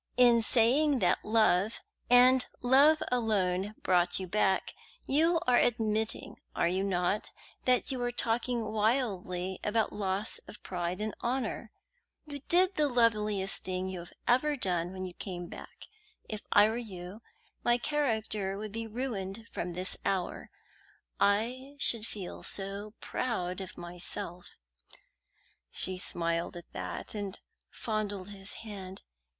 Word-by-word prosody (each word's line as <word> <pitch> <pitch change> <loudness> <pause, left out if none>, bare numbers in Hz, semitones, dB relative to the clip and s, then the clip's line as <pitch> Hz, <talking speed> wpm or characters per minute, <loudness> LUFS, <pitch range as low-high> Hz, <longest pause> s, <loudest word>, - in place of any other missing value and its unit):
In 240 -2 +6
saying 260 +6 +4
that - - +2
love, 215 -1 +3 0.3
and 250 +1 +6 0.2
love 280 +5 +6
alone, 205 -4 +1
brought 175 0 +3
you 190 - -3
back, 190 0 +1 0.3
you 330 +4 +4
are 250 -1 +5
admitting, 220 -2 0 0.2
are - - +2
you 185 +2 0
not, 190 +1 0 0.4
that 255 +2 +2
you 260 - -2
were 245 0 -1
talking 235 -1 -1
wildly 200 -5 0
about 220 +1 +1
loss 200 +1 +1
of - - -12
pride 180 +1 -3
and 215 0 -1
honour? 240 -2 -2 0.5
You 290 -2 -7
did 370 +2 +4
the 300 -1 +4
loveliest 210 -5 +2
thing 185 0 -3
you 185 -1 -5
have 170 - -11
ever 285 +4 +3
done 175 -5 0
when 185 0 -5
you 180 - -7
came 175 -1 -6
back. - - -11 0.4
If 215 -1 -6
I 205 - +7
were 220 +2 -2
you, 195 -2 -8 0.4
my 240 0 +4
character 220 -8 -1
would 215 0 -5
be 225 +1 -4
ruined 220 -3 -4
from 175 0 -4
this 185 +2 0
hour 190 -2 -2 0.7
I 245 +7 +1
should 230 -5 +3
feel 190 -4 -6
so 200 +2 -1
proud 185 -7 -2
of 190 - -8
myself." 175 +1 -3 1.1
She 185 -1 -2
smiled 170 0 -1
at 170 - -12
that, - - -5
and 205 -2 -4 0.3
fondled 205 -3 -3
his 195 -1 -5
hand. 195 -3 -8
210 Hz, 135 wpm, -31 LUFS, 185-240 Hz, 1.1 s, I